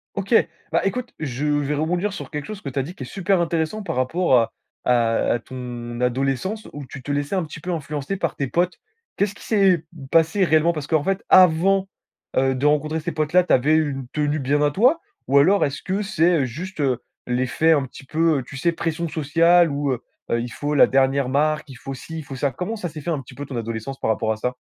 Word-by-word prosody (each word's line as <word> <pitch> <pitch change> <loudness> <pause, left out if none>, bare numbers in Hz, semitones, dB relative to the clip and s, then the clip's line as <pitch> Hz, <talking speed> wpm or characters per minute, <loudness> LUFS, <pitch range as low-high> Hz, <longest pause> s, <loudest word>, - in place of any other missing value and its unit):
Ok. 195 +2 -2 0.4
Bah, 165 - +2
écoute, 245 +5 -2
je 140 -2 -3
vais 145 -1 +1
rebondir 175 +7 -1
sur - - -7
quelque 150 -1 -4
chose 215 -2 -7
que 140 - -5
tu 135 - -3
as - - 0
dit, 170 +7 -8
qui - - -7
est - - -6
super 195 -2 0
intéressant 170 +5 -1
par 195 - -3
rapport 130 +4 +2
à 115 0 0 0.3
à 115 -2 +2
à 120 - 0
ton 120 -1 -7
adolescence, 135 - -1
où 145 -1 -7
tu 130 +1 -10
te 145 - -4
laissais 145 +5 -1
un 185 - +1
petit 150 -1 -8
peu 180 +4 -4
influencer 150 +1 -3
par 170 -4 -2
tes 140 - -2
potes. 175 +6 0 0.4
Qu'est-ce 200 0 0
qui - - -14
s'est 195 -6 +3 0.3
passé 165 +4 +4
réellement? 160 0 +4
Parce 150 -3 -5
qu'en 155 -3 +2
fait, 195 +2 0
avant, 185 +2 +5 0.5
heu, 130 0 +3
de 130 +3 -2
rencontrer 150 +2 +2
ces 170 +2 -3
potes-là, 155 +3 +2
tu - - +1
avais 145 +5 +4
une 140 -5 -1
tenue 150 0 0
bien 145 +2 +1
à 145 0 +3
toi? 250 - +4 0.3
Ou 140 - +3
alors 185 +9 +5
est-ce 140 -1 -4
que 195 +2 -1
c'est, 175 -7 +2
juste, 165 +10 -7
heu, 130 -4 0 0.2
l'effet, 130 +6 +2
un 145 -3 +1
petit 135 - -12
peu, 160 +1 +2
heu, - - -5
tu 140 - -11
sais, 170 +5 +2
pression 165 0 -2
sociale 165 +3 +4
où, 140 -1 -1
heu 125 - -2 0.3
heu, 115 - +2
il 120 - -4
faut 145 +5 -3
la - - +7
dernière 135 0 +2
marque, 150 +2 +1
il 135 - -10
faut 135 +2 -7
ci, 160 +4 -7
il - - -7
faut 135 -1 -8
ça? 140 +1 0
Comment 180 - -4
ça 185 - -4
s'est 155 0 -8
fait 170 - -5
un 150 -4 -1
petit 130 - -14
peu 145 - -6
ton 130 -3 -6
adolescence, 115 +3 -5
par - - -1
rapport 110 0 +1
à 110 - -2
ça? 125 +3 -2
150 Hz, 240 wpm, -22 LUFS, 135-175 Hz, 0.5 s, la